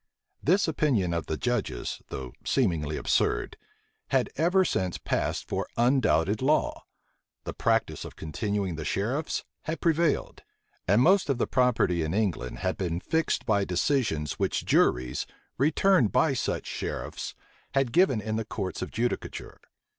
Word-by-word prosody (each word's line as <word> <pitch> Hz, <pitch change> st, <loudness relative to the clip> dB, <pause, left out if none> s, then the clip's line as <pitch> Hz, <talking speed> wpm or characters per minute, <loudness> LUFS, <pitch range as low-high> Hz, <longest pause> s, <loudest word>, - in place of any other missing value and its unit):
This 185 Hz, +6 st, +3 dB
opinion 130 Hz, -, +1 dB
of 85 Hz, -1 st, -2 dB
the 80 Hz, -, -2 dB
judges, 105 Hz, -, -2 dB
though 65 Hz, -2 st, -6 dB
seemingly 85 Hz, -, 0 dB
absurd, -, -, 0 dB, 0.5 s
had -, -, +1 dB
ever 180 Hz, +5 st, +3 dB
since 95 Hz, -, -1 dB
passed -, -, -2 dB
for -, -, -2 dB
undoubted 110 Hz, -, +2 dB
law; 150 Hz, +4 st, +1 dB, 0.6 s
the -, -, -5 dB
practice -, -, 0 dB
of -, -, -9 dB
continuing 95 Hz, +2 st, -2 dB
the 80 Hz, -, -4 dB
sheriffs 120 Hz, -, -1 dB, 0.2 s
had 160 Hz, +1 st, -3 dB
prevailed: 165 Hz, -2 st, +1 dB, 0.5 s
and 105 Hz, +6 st, +5 dB
most 190 Hz, 0 st, +4 dB
of 135 Hz, -, +2 dB
the -, -, +1 dB
property 120 Hz, -9 st, +2 dB
in 80 Hz, +3 st, -1 dB
England 95 Hz, -, -1 dB
had 95 Hz, -, 0 dB
been 85 Hz, -4 st, -2 dB
fixed 160 Hz, -, 0 dB
by 100 Hz, -3 st, +2 dB
decisions 90 Hz, -, 0 dB
which -, -, 0 dB
juries, 65 Hz, +2 st, +2 dB, 0.3 s
returned 155 Hz, -, +3 dB
by 135 Hz, +3 st, +3 dB
such 130 Hz, -, -2 dB
sheriffs, -, -, -5 dB, 0.4 s
had 135 Hz, -3 st, +2 dB
given 175 Hz, -, +4 dB
in 110 Hz, +1 st, -2 dB
the 115 Hz, -, -1 dB
courts 100 Hz, -3 st, -4 dB
of -, -, -3 dB
judicature. 120 Hz, +2 st, -3 dB
110 Hz, 145 wpm, -27 LUFS, 90-140 Hz, 0.6 s, and